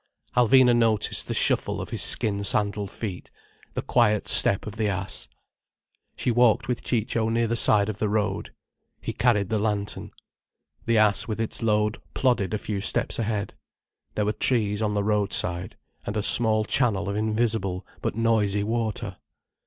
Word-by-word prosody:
Alvina 125 0 +5
noticed 115 -3 0
the - - -3
shuffle - - 0
of - - -7
his - - -2
skin 100 -2 +2
sandalled 100 -1 +1
feet, 100 -3 -7 0.5
the - - -3
quiet 105 -4 +1
step 100 - +5
of 105 - -7
the 110 -1 -1
ass. 95 -1 -3 0.9
She 125 - -1
walked 120 -2 +2
with 125 -1 -2
Ciccio 115 -1 -1
near 115 +1 0
the 115 +1 -1
side 105 -3 +3
of 110 -1 -5
the 105 - -1
road. 105 -2 -2 0.5
He - - -5
carried 105 -6 +1
the 110 - 0
lantern. 105 -1 -3 0.8
The 115 -1 +2
ass 105 -1 +2
with 110 -1 -4
its 115 +1 -1
load 105 -1 0
plodded 120 -7 +1
a - - -1
few 105 -1 -5
steps 110 - -1
ahead. 105 -2 -3 0.6
There 105 - 0
were 105 - 0
trees 105 -5 0
on 105 -1 -1
the 100 - 0
road 105 -1 0
side, 90 +1 0 0.3
and 105 - -4
a 105 - -1
small 110 -1 +5
channel 105 -5 +1
of 100 - -3
invisible 105 -3 -1 0.2
but - - -3
noisy 110 -3 +1
water. 110 0 -3
105 Hz, 170 wpm, -24 LUFS, 100-115 Hz, 0.9 s, Alvina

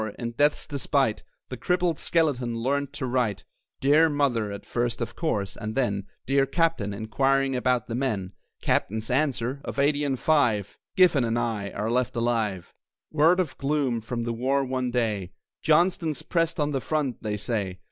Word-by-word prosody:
in 120 -1 -4
death's 145 +5 +2
despite 140 -5 0 0.3
The 130 - -5
crippled 180 +1 0
skeleton 135 -8 +1
learned 140 +4 -1
to - - -4
write. 125 -5 0 0.4
"Dear 150 +4 +5
Mother," 130 -8 0
at 100 - -7
first 120 -1 -1
of 115 -1 -4
course; 105 - -2
and 110 0 -5
then 100 -7 0 0.2
"Dear 135 +1 +2
Captain," 165 - +1
inquiring 135 +6 +1
about 125 -1 +1
"the 115 - -6
men." 110 -7 -1 0.3
Captain's 110 +4 0
answer: 135 -1 0
"Of - - -6
eighty 145 +1 +2
and 135 -2 0
five, 120 -11 +2 0.2
Giffen 175 -8 +5
and 115 0 0
I 110 -4 -1
are 105 +3 -3
left 125 0 0
alive." 115 -6 -1 0.4
Word 160 +4 +4
of 170 -7 -1
gloom 135 -4 0
from 120 +1 -4
the 120 0 -2
war 135 +4 +1
one 130 -1 -1
day: 110 -7 -1 0.3
"Johnston's 160 -2 +2
pressed 165 -1 0
at 150 0 +1
the 135 -2 -1
front, 145 -5 -2
they 105 -1 -2
say!" 105 -4 -2
130 Hz, 165 wpm, -26 LUFS, 115-145 Hz, 0.4 s, Dear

